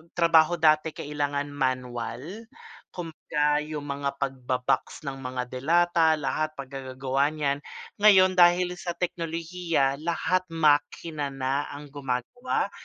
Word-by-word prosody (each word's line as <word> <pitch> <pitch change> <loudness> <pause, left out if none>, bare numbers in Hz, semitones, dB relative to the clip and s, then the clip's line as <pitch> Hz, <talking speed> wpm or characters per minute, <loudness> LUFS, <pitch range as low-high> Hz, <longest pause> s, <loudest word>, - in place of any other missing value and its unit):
trabaho 165 -1 +5
dati 155 -1 +3
kailangan 145 -1 -3
manual. 130 - -3 0.5
Kumbaga 150 -3 -1
'yong 150 -1 -5
mga 140 -1 -3
pagba-box 130 +1 -2
ng 135 -1 -5
mga 125 -1 -5
delata 165 +4 +3
lahat 155 +2 -2
paggagagawa 135 0 -2
niyan. 145 -2 0 0.4
Ngayon 190 -3 +7
dahil 175 +1 +5
sa 175 -1 -4
teknolohiya 165 -4 -1
lahat 170 +3 0
makina 155 -1 +1
na 135 +1 -2
ang 145 0 -10
gumagawa. 135 - -2
150 Hz, 105 wpm, -26 LUFS, 135-165 Hz, 0.5 s, Ngayon